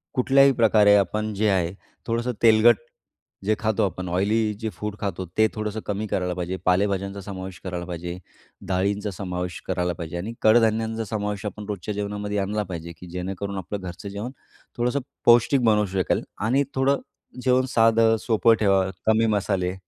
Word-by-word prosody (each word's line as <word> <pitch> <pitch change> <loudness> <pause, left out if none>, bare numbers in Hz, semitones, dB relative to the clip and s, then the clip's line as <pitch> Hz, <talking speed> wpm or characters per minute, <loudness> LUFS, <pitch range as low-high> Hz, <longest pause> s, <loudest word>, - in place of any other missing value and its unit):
कुठल्याही 135 +1 +5
प्रकारे 110 -3 +5
आपण 105 +2 0
जे 105 +2 +1
आहे, 90 -2 +1 0.3
थोडंसं 115 +2 0
तेलकट 115 +1 +7 0.7
जे 110 +1 +2
खातो 110 -1 +1
आपण 90 -1 -4
ऑयली 105 +4 +1
जे 110 -1 -2
फूड 105 -1 -5
खातोत 95 -3 -3
ते 110 - +5
थोडंसं 110 0 -3
कमी 105 +1 -2
करायला 90 -2 -1
पाहिजे. 90 +1 -3
पालेभाज्यांचा 100 +1 +1
समावेश 95 -2 -7
करायला 90 -2 -4
पाहिजे. 85 0 -5 0.5
डाळींचा 100 +2 0
समावेश 90 -2 -4
करायला 90 -1 0
पाहिजे. 85 +1 -6
आणि 105 +7 -5
कडधान्यांचा 110 0 +3
समावेश 105 -1 -3
आपण 105 0 -5
रोजच्या 105 +1 -4
जेवणामध्ये 105 0 -3
आणला 105 +2 -1
पाहिजे, 85 -2 -7
की 90 - -10
जेणेकरून 95 +2 -4
आपलं 95 +2 -4
घरचं 95 +2 -7
जेवण 105 +6 -5 0.5
थोडंसं 125 +4 +1 0.3
पौष्टिक 120 +2 +5
बनवू 105 -2 +4
शकेल 95 -1 0 0.2
आणि 135 +4 +3
थोडं 135 +1 +2 0.4
जेवण 130 0 +3
साधं, 115 0 +5
सोपं 115 0 +4
ठेवा. 95 -2 +3 0.2
कमी 110 +1 +4
मसाले. 95 -3 0
105 Hz, 155 wpm, -24 LUFS, 95-110 Hz, 0.7 s, तेलकट